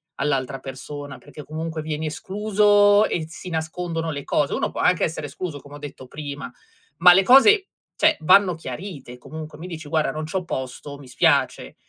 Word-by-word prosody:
all'altra 135 -2 -1
persona, 140 +2 -8
perché 150 - -12
comunque 160 +1 -5
vieni 155 0 -4
escluso 205 +4 +3
e 165 - -2
s 165 - -12
si 180 - -8
nascondono 165 0 -3
le 140 -2 -5
cose, 145 - 0
uno - - -1
può - - -5
anche 180 -1 +3
essere 155 -2 -2
escluso 145 +1 -6
come 145 0 -13
ho - - -8
detto 145 -3 -9
prima, 145 -2 -7 0.5
ma 180 +2 +8
le 195 +2 +5
cose, 385 - +6 0.3
cioè 315 0 +3
vanno 185 +3 +5
chiarite, 140 -3 -8
comunque 155 +3 -9
mi 165 - -9
dici: 160 -3 -8
"Guarda, 155 -1 +1
non 155 0 -5
c'ho 185 +4 -3
posto, 135 -1 -6
mi 140 -2 -14
spiace", 125 - +1
160 Hz, 180 wpm, -23 LUFS, 145-185 Hz, 0.5 s, ma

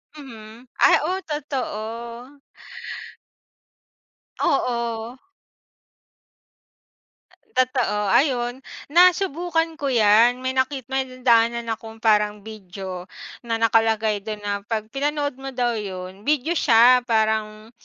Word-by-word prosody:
Mhm. 235 -4 -12
Ay - - +6
oh, 365 +4 -1
totoo. 245 -3 -5 2.0
Oo. 235 0 -1 2.4
Totoo 250 -6 +1
ayun 250 -3 +1 0.3
nasubukan 340 -1 +2
ko 285 - -2
yan, 235 0 +4
may 260 - 0
nakit 260 +1 0
may 265 0 0
nadaanan 235 -2 +1
akong 225 0 -8
parang 210 -1 +2
video 190 -4 -8 0.4
na 230 -1 -1
nakalagay 220 -1 +2
dun 210 +1 -7
na 205 0 -2
pag 215 -1 -3
pinanood 285 0 -2
mo 270 0 -7
daw 240 -2 0
yun, 190 0 -7
video 300 +1 +1
siya, 245 -1 +6
parang 220 -1 -1
235 Hz, 95 wpm, -22 LUFS, 215-265 Hz, 2.4 s, Ay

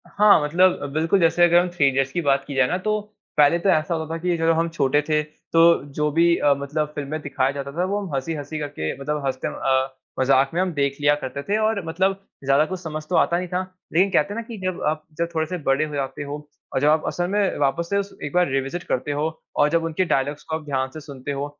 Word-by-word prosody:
हाँ, 205 -5 +5
मतलब 180 +5 +3
अ, - - -2
बिल्कुल 165 +5 +2
जैसे 170 0 +3
अगर 175 0 +6
हम 180 - -2
थ्री 155 -5 +2
इडियट्स 135 0 +1
की 175 - -1
बात 140 -3 +2
की 140 - -5
जाए 130 -1 +4
ना 180 - 0
तो, 215 +3 -1 0.4
पहले 150 +3 +5
तो 195 - +1
ऐसा 155 -1 +2
होता 160 0 -4
था - - -2
कि 175 -1 0
जब 165 0 +1
हम 165 0 +1
छोटे 145 -3 +1
थे, 155 0 +3
तो 165 +2 +2
जो 150 +1 0
भी 170 +2 +4
अ, 145 - +4
मतलब 150 +2 -2
फ़िल्म 140 -2 -4
में 155 +1 -3
दिखाया 135 -2 0
जाता 140 0 -6
था 175 +5 -1
वो 200 +2 -1
हम 170 - -8
हँसी-हँसी 145 +2 -4
करके 145 - -3
मतलब 150 0 -2
हँसते 130 -1 -2
अ, 130 0 0 0.2
मज़ाक 135 +1 +4
में 175 - +1
हम 185 -2 -1
देख 140 -1 0
लिया 145 0 +5
करते 140 -1 -5
थे 205 +6 0
और 215 -2 0
मतलब 190 +4 0 0.2
ज़्यादा 135 +3 +3
कुछ 185 +2 -5
समझ 155 -3 -5
तो 180 - 0
आता 170 - +3
नहीं 180 +1 -3
था। 180 +1 -1 0.3
लेकिन 185 +5 +4
कहते 175 +2 +2
हैं - - -7
ना 230 - -2
कि 230 - -7
जब 185 -1 -2
आप 155 0 -1
जब 170 - 0
थोड़े 160 0 +1
से 180 - -3
बड़े 135 +3 +2
हो 150 -1 -7
जाते 140 +1 -3
हो 145 0 -5 0.4
और - - +1
जब 145 - +3
आप 155 +1 +3
असल 175 0 -1
में 200 0 0
वापस 145 +4 0
से 200 - +1
उस 200 0 -2
एक 145 - -5
बार 180 -3 +3
रिविसिट 135 +6 -2
करते 130 +3 -2
हो 145 +1 -1 0.4
और 145 - +5
जब 165 +1 +1
उनके 165 +3 0
डायलॉग्स 145 -1 -1
को 160 - -3
आप 160 - -11
ध्यान 135 -2 -1
से 155 - -7
सुनते 140 -2 -7
हो 140 0 -2
155 Hz, 265 wpm, -23 LUFS, 140-175 Hz, 0.4 s, अगर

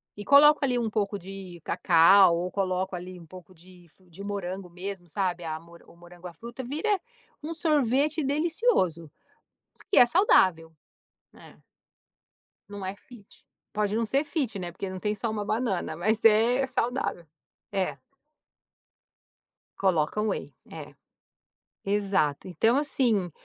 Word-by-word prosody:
e 205 - -8
coloco 295 +4 +6
ali 255 -2 +1
um 230 -2 -1
pouco 205 -1 -1
de 190 -2 -10
cacau 170 +2 +5
ou 180 +1 -3
coloco 190 -1 -2
ali 180 +1 -8
um 170 - -13
pouco 180 +1 -13
de 175 +1 -18
fru 185 +2 -23
de 195 +5 -10
morango 195 -2 -5
mesmo 180 0 -7
sabe, 180 -1 -2
a 160 -1 -4
mo 170 +1 -17
o - - -18
morango 175 +1 -13
a 175 - -10
fruta 235 +9 -9
vira, 320 - -1 0.4
um 310 +2 -6
sorvete 300 -1 +1
delicioso. 285 - 0 0.7
Porque - - -3
é - - +9
saudável. 185 - +3 0.6
É. - - -16 1.1
Não 205 -1 -7
é 190 - -4
fit. 210 0 -18 0.3
Pode 210 0 -1
não 230 - +1
ser 275 +6 +1
fit, 270 - -3
né. 175 -2 -5
Porque 190 +2 -6
não 185 - -7
tem, 210 +1 -1
só 225 +2 -3
uma 210 -1 -3
banana. 205 -7 -2
Mas 215 +6 0
é 230 +4 +4
saudável. 245 -8 -2 0.5
É. 185 -8 -2 1.8
Coloca 185 0 +1
whey, 205 -8 -3 0.2
é. 150 -2 -10 0.9
Exato, 195 -7 0
então 225 - +2
assim, 240 - 0
195 Hz, 145 wpm, -27 LUFS, 175-240 Hz, 1.8 s, é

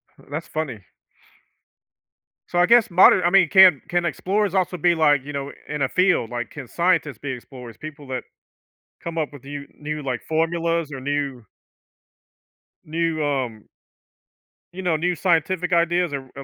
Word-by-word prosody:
Hm - - -21
that's 155 +3 -5
funny. 130 - -5 1.6
So 175 - 0
I 175 - +6
guess 235 +2 +5
modern 180 0 +6
I 175 - +4
mean, 190 -3 +4
can 185 -7 +7
can 175 -1 0
explorers 195 +2 -1
also 180 -1 0
be 175 0 +3
like, 145 -4 +3
you 145 - -7
know, 140 0 -4 0.2
in 150 -1 -4
a 130 - +1
field? 180 - +2
Like, 120 -1 -4
can 140 -5 -9
scientists 170 -3 0
be 140 -2 -5
explorers? 125 -2 -10
People 150 -2 -10
that 130 -1 -4 0.8
come 170 -1 -5
up 155 -2 -1
with 140 -2 -13
you 140 0 -7
new 150 0 -4
like 125 -3 -3
formulas 165 -1 0
or 135 - -6
new 140 -3 -3 1.4
new 165 0 -1
um 130 -7 -3 1.1
you 190 - -6
know, 175 -3 +1
new 175 +3 0
scientific 180 +1 0
ideas 170 0 +2
or 135 -2 -5
or, 140 - -7
155 Hz, 165 wpm, -22 LUFS, 140-175 Hz, 1.6 s, can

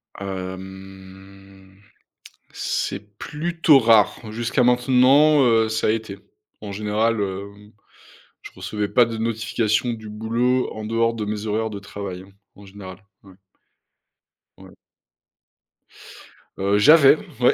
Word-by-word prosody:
Hem, 95 0 -10 0.7
c'est 100 +1 -4
plutôt 160 0 +2
rare. 110 -4 +3
Jusqu'à 120 +3 -1
maintenant, 130 +4 +4
heu, 115 -2 +3
ça 110 - -1
a - - +3
été. 110 -3 -4 0.4
En 105 -1 -7
général, 105 +2 -1
hem, 100 +1 -7 0.7
je - - -12
recevais 105 -1 -4
pas 120 +3 +3
de 115 -1 -6
notifications 110 +1 -1
du 110 -1 -9
boulot 115 +4 -1
en 110 0 -7
dehors 115 +1 0
de 110 -2 -5
mes 105 0 -4
horaires 110 +1 -2
de 100 -2 -7
travail 95 -2 -8 0.3
en 100 - -15
général. 95 -1 -12 0.2
Ouais. 95 -1 -17 1.2
Ouais. - - -15 1.9
Heu, 100 +1 +1
j'avais, 150 +3 +6 0.2
ouais, 125 - +4
110 Hz, 115 wpm, -22 LUFS, 100-115 Hz, 1.9 s, j'avais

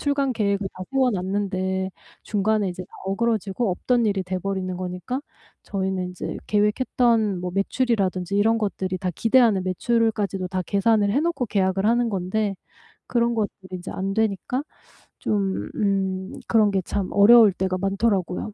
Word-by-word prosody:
출간 280 -2 +1
계획을 200 -2 0
다 185 - -7
세워 265 -2 +3
놨는데 190 -1 -1 0.3
중간에 210 -1 +1
이제 180 +1 -6 0.2
어그러지고 215 0 0
없던 240 +6 +1
일이 200 -2 0
돼 185 0 -3
버리는 185 -1 -3
거니까 180 +8 -4 0.4
저희는 190 -2 -2
이제 180 - -5
계획했던 215 -1 +2
뭐 180 0 -3
매출이라든지 195 -3 0
이런 225 +3 +3
것들이 190 -3 -2
다 185 - -2
기대하는 225 -3 +4
매출까지도 205 -1 0
다 185 0 -2
계산을 205 0 +2
해 270 - +2
놓고 325 -6 -1
계약을 195 -1 +1
하는 235 +1 +2
건데 195 +2 -1 0.5
그런 235 -1 +1
것들이 195 -3 -4
이제 175 - -8
안 195 +1 -3
되니까 220 +5 -1 0.6
좀 200 -2 -1
음 190 -2 -1
그런 215 -3 +4
게 195 -1 +1
참 195 +2 -2
어려울 220 +1 +7
때가 185 0 -1
많더라고요. 195 0 -1
200 Hz, 335 characters per minute, -24 LUFS, 190-225 Hz, 0.6 s, 어려울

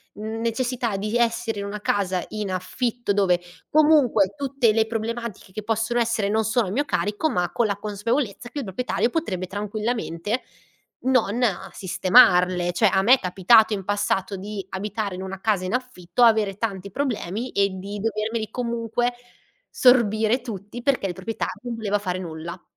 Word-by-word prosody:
necessità 230 +2 -2
di 210 +4 -1
essere 230 -1 0
in 200 - -4
una 205 +1 -5
casa 190 -3 0
in 210 -3 -4
affitto 235 +4 -2
dove 185 -3 +2 0.3
comunque 290 -10 +4
tutte 275 -4 +2
le 220 +1 +2
problematiche 225 -2 -5
che 215 +3 -6
possono 225 +2 0
essere 230 -3 +1
non 220 +1 +2
sono 220 -1 +1
a - - -3
mio 280 +8 0
carico 210 +5 0
ma 175 -1 0
con 235 - +1
la 200 -2 -1
consapevolezza 215 +3 -2
che 290 - -5
il - - -3
proprietario 230 +4 -1
potrebbe 195 - -2
tranquillamente 210 0 -3 0.6
non, 255 -5 +2
uhm, 200 -6 0
sistemarle. 180 -1 +4
Cioè 215 - +2
a 190 - +2
me 230 +6 +6
è - - -8
capitato 210 +4 +4
in 195 -2 -3
passato 200 -1 0
di 200 +1 -6
abitare 200 0 -3
in 185 - -6
una 190 0 -7
casa 205 -4 +1
in 185 - -3
affitto, 250 -5 -3
avere 215 -4 +4
tanti 200 -3 -3
problemi 235 -2 -2
e 200 0 +2
di 195 +2 -6
dovermeli 220 +1 -2
comunque 235 0 -1 0.6
sorbire 235 -2 +4
tutti 225 0 -7
perché 265 -7 +1
il 180 - -3
proprietario 190 +5 -4
non 245 -1 -4
voleva 210 -2 0
fare 185 -3 -3
nulla. 170 0 -7
215 Hz, 165 wpm, -24 LUFS, 195-235 Hz, 0.6 s, me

